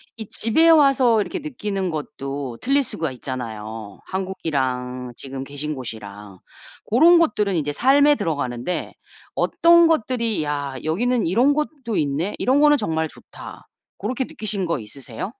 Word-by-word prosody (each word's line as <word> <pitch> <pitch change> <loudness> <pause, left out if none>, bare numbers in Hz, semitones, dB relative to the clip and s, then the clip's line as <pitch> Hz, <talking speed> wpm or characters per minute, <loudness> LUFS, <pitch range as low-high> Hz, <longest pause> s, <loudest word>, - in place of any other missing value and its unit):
이 220 -3 -8
집에 320 +10 +3
와서 275 -7 +5
이렇게 340 - -2
느끼는 210 - -3
것도 140 -4 -5
틀릴 275 +2 +2
수가 160 - -4
있잖아요, 110 -5 -7
한국이랑 130 -9 -3
지금 135 -1 -6
계신 145 +2 -5
곳이랑. 105 -6 -9 0.5
고런 330 +10 +6
것들은 210 - +1
이제 150 -2 -1
삶에 285 - +4
들어가는데 145 - -3 0.4
어떤 340 0 +5
것들이 235 - 0
'야 145 -2 -3
여기는 235 +7 +1
이런 245 +11 +3
곳도 285 -7 -3
있네. 150 +7 -1
이런 265 +3 +3
거는 295 -1 +6
정말 160 - -1
좋다.' - - -12 0.3
고렇게 250 +6 -2
느끼신 205 -5 -4
거 165 -6 -1
있으세요? 120 - -7
180 Hz, 310 characters per minute, -22 LUFS, -, 0.5 s, 고런